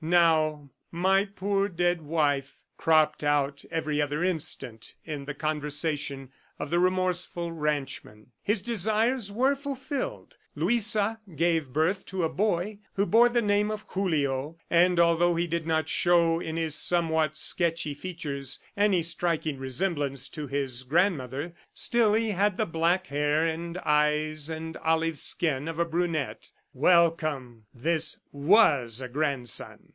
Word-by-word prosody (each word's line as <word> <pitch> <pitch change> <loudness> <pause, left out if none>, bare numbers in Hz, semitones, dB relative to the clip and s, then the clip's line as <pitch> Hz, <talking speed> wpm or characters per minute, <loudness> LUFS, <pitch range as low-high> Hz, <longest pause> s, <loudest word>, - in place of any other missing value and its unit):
Now 155 -4 +2 0.2
"my 190 +3 +2
poor 200 0 -1
dead 175 -1 0
wife" 145 -3 -1 0.2
cropped 155 -2 +2
out 145 -1 0
every 155 -2 -1
other 145 +3 -1
instant 155 -10 -3
in 150 -3 -5
the 150 0 -6
conversation 150 -3 -3 0.3
of 145 - -6
the 175 - +2
remorseful 180 -1 +1
ranchman. 145 -8 -4
His 205 -2 -1
desires 220 +1 +1
were 260 +6 +2
fulfilled. 285 - -5 0.2
Luisa 215 +5 +2 0.2
gave 165 -2 +1
birth 160 +8 0
to 190 -2 -3
a 160 - +1
boy 205 +1 -1
who 200 - +1
bore 235 +3 +5
the 240 -1 +1
name 205 0 +2
of 215 0 -5
Julio, 150 -5 -1
and 175 +1 +4
although 170 +1 +3
he 170 +1 0
did 170 -1 -3
not 160 -1 +1
show 170 -1 +3
in 160 -1 -5
his 160 -2 -1
somewhat 160 -2 +2
sketchy 165 -2 +1
features 145 -5 -5 0.2
any 200 -4 +2
striking 165 -3 -1
resemblance 140 0 -2
to 150 -2 -6
his 135 -2 -2
grandmother, 145 0 0 0.2
still 225 -3 +2
he 225 -1 +1
had 200 0 +1
the - - +1
black 170 +3 +1
hair 150 +2 +1
and 170 +2 -3
eyes 150 0 +1
and 160 0 -6
olive 160 -1 0
skin 150 -3 +1
of 165 -1 -5
a 170 - +2
brunette. 160 -9 -2 0.2
Welcome!... 155 -7 +1
This 160 +6 0
WAS 140 - +3
a 130 - -4
grandson! 135 -2 -2
165 Hz, 140 wpm, -27 LUFS, 145-185 Hz, 0.3 s, bore